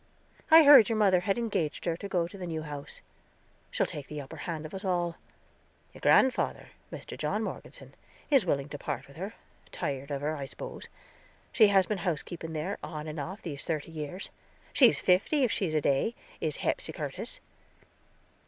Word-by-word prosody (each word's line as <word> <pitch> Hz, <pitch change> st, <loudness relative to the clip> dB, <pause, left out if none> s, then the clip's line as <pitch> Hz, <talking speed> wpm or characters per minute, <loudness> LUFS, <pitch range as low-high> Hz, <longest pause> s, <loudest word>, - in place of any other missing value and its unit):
I 320 Hz, 0 st, +10 dB
heard 280 Hz, -7 st, +9 dB
your 225 Hz, -, +1 dB
mother 195 Hz, -4 st, +5 dB
had 195 Hz, +3 st, 0 dB
engaged 210 Hz, -10 st, -2 dB
her 170 Hz, -, +1 dB
to 200 Hz, -, -7 dB
go 175 Hz, -3 st, +1 dB
in 190 Hz, +3 st, -10 dB
the 180 Hz, -, -5 dB
new 160 Hz, -2 st, -3 dB
house; 145 Hz, -2 st, -8 dB, 0.7 s
she'll -, -, +1 dB
take 145 Hz, -2 st, -6 dB
the 150 Hz, -, -6 dB
upper 135 Hz, -2 st, -8 dB
hand 160 Hz, -2 st, -3 dB
of 155 Hz, -, -9 dB
us 190 Hz, -, -4 dB
all. 175 Hz, -3 st, 0 dB, 0.8 s
Your -, -, -13 dB
grandfather, 260 Hz, -1 st, +3 dB, 0.2 s
Mr. -, -, -7 dB
John -, -, -1 dB
Morgeson, -, -, -7 dB, 0.4 s
is 275 Hz, -6 st, +6 dB
willing 140 Hz, -5 st, 0 dB
to -, -, -6 dB
part -, -, -4 dB
with -, -, -16 dB
her; -, -, -5 dB, 0.4 s
tired 140 Hz, 0 st, -3 dB
of 140 Hz, -1 st, -3 dB
her, 155 Hz, +2 st, -1 dB
I 140 Hz, -2 st, -5 dB
spose. -, -, -8 dB, 0.6 s
She 220 Hz, -, +6 dB
has 195 Hz, -2 st, +4 dB
been 205 Hz, +1 st, -2 dB
housekeeping 165 Hz, -1 st, -3 dB
there, 165 Hz, +6 st, -3 dB
off 150 Hz, -2 st, -6 dB
and 155 Hz, 0 st, -5 dB
on, 180 Hz, +7 st, -5 dB
these 145 Hz, -4 st, -5 dB
thirty 160 Hz, -1 st, -3 dB
years. 160 Hz, +4 st, -6 dB, 0.4 s
She's 250 Hz, -5 st, +6 dB
fifty, 200 Hz, +11 st, +3 dB
if 245 Hz, -, +2 dB
she 195 Hz, -, 0 dB
is 155 Hz, -, -3 dB
a 155 Hz, -, +3 dB
day, 140 Hz, -, +1 dB, 0.2 s
is -, -, -2 dB
Hepsy -, -, -2 dB
Curtis." -, -, -5 dB
175 Hz, 190 wpm, -29 LUFS, 150-200 Hz, 0.8 s, I